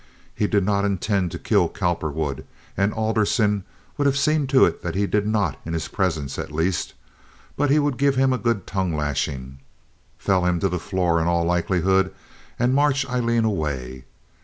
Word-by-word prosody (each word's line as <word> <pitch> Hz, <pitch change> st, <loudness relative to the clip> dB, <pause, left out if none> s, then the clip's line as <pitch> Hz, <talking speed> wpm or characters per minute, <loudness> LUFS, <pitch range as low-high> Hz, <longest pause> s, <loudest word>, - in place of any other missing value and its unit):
He 105 Hz, -, 0 dB
did 100 Hz, -2 st, +2 dB
not 100 Hz, 0 st, +1 dB
intend 100 Hz, -1 st, 0 dB
to 85 Hz, -, -6 dB
kill -, -, +2 dB
Cowperwood—and 80 Hz, +4 st, -3 dB
Alderson 110 Hz, -2 st, +1 dB, 0.3 s
would 145 Hz, -, +3 dB
have 140 Hz, 0 st, +2 dB
seen 150 Hz, 0 st, +2 dB
to 135 Hz, 0 st, +5 dB
it 85 Hz, -, -2 dB
that 85 Hz, 0 st, -4 dB
he 100 Hz, +1 st, +1 dB
did 105 Hz, +1 st, 0 dB
not 105 Hz, -1 st, 0 dB
in 80 Hz, -, -5 dB
his 80 Hz, -, -2 dB
presence 80 Hz, -, -2 dB
at -, -, -5 dB
least, 85 Hz, +4 st, -1 dB, 0.6 s
but 145 Hz, 0 st, +1 dB
he 145 Hz, -, +4 dB
would 145 Hz, -4 st, 0 dB
give 140 Hz, -1 st, +3 dB
him 130 Hz, 0 st, +3 dB
a 125 Hz, -, -1 dB
good 115 Hz, -5 st, 0 dB
tongue 95 Hz, -4 st, -1 dB
lashing, 70 Hz, -3 st, -3 dB, 0.6 s
fell 95 Hz, -2 st, +1 dB
him 90 Hz, -1 st, +1 dB
to 95 Hz, -, +1 dB
the 90 Hz, -, -2 dB
floor, 85 Hz, -2 st, 0 dB
in 80 Hz, -, 0 dB
all 85 Hz, -1 st, +2 dB
likelihood, 95 Hz, +2 st, +1 dB, 0.5 s
and 125 Hz, +2 st, +2 dB
march 140 Hz, 0 st, +2 dB
Aileen 120 Hz, -3 st, +1 dB
away. 70 Hz, -, -3 dB
95 Hz, 180 wpm, -23 LUFS, 85-115 Hz, 0.6 s, to